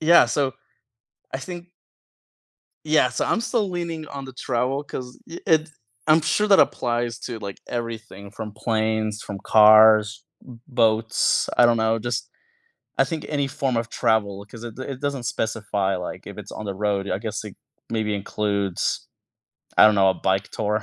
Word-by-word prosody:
yeah, 170 +2 +6
so 140 -3 0 0.8
I - - -1
think 175 +5 -8 1.2
Yeah, - - +4
so - - -2
I'm - - +1
still 230 -3 0
leaning 170 -3 -4
on 140 -2 -7
the 130 - -9
travel, 130 +3 -1
'cause 125 -3 -7
it 160 -2 0 0.4
I'm 155 +1 +5
sure 165 +7 +1
that 200 -2 +6
applies 120 -1 0
to, 115 -3 -6
like, 100 -2 -7
everything 115 -4 -6
from 105 +1 -7
planes, 110 0 -1
from 100 -1 -7
cars, 110 -1 +6 0.2
b 130 - -13 0.2
boats, 115 -3 +2
I 120 - +8
don't 120 0 +3
know, 110 0 +2
just, 120 +1 -3 0.7
I - - +4
think 160 -3 -5
any 140 -2 0
form 135 -3 -1
of 115 0 -2
travel, 100 -3 0
'cause 115 +2 -11
it 115 -2 -8
d 130 - -6
it 130 - -9
doesn't 140 -3 -2
specify 105 -4 -1
like 90 -1 -7
if - - -9
it's - - -9
on 110 - -7
the 100 - -3
road, 100 0 -1
I - - 0
guess - - -5
it - - -8 0.4
maybe 110 -2 -1
includes, 100 -2 -2 0.7
I - - +10
don't 110 - +5
know, 95 -1 +5
a - - -1
bike 95 +1 0
tour. 105 +1 -1
115 Hz, 175 wpm, -23 LUFS, 105-135 Hz, 1.2 s, I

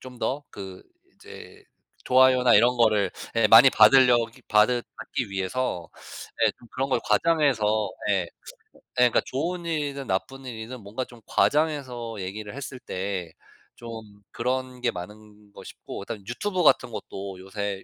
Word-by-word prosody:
좀 125 -1 -12
더 140 +4 -2
그 95 -2 -9 0.3
이제 - - -13 0.4
좋아요나 130 -1 +5
이런 120 +4 +5
거를 105 -4 +3 0.3
예 115 -1 +4
많이 115 +4 +9
받으려 120 +1 +6
기 130 - -19
받으 110 +3 +4 0.2
받기 125 -5 -4
위해서 95 -2 -3 0.6
예 - - +3
좀 120 - -18
그런 135 +1 -2
걸 130 - +1
과장해서 110 -5 +2 0.2
예. - - +4
예 85 - -10 0.7
그러니까 125 -2 +4
좋은 170 +6 -3
일이든 145 -5 -3
나쁜 130 +8 -3
일이든 120 +1 -7
뭔가 105 +6 -5
좀 120 -1 -16
과장해서 130 -7 0
얘기를 105 +4 -6
했을 130 -2 -7
때 95 -6 -5 0.4
좀 110 -3 -10
그런 130 +1 -3
게 120 - +1
많은 105 +3 -11
거 - - -12
싶고 - - -9
그다음 105 +2 -6
유튜브 185 +8 -2
같은 135 -4 +4
것도 100 -3 -7
요새 100 0 -5
120 Hz, 290 characters per minute, -25 LUFS, 105-130 Hz, 0.7 s, 많이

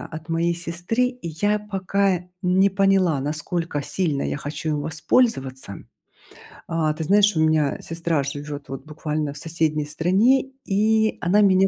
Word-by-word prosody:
от 160 0 -9
моей 170 +1 +1
сестры. 175 +8 -1
И 250 -8 -6
я 205 +7 0
пока 195 -2 0 0.2
не 190 +2 +3
поняла, 195 -6 +3
насколько 155 +2 -2
сильно 145 -1 -1
я - - -2
хочу 150 +2 -4
им 150 -1 -1
воспользоваться. 140 - 0 0.8
А, 160 -2 0
ты 160 - -4
знаешь, 205 +3 +4
у 155 - +2
меня 155 -2 +2
сестра 165 -2 -1
живет, 145 +1 -6
вот, 135 +1 -7
буквально 150 -1 -3
в 145 - -10
соседней 155 -1 -1
стране, 200 - +2
и 220 +2 +2
она 195 +5 +3
меня 195 -1 +5
165 Hz, 150 wpm, -23 LUFS, 150-195 Hz, 0.8 s, меня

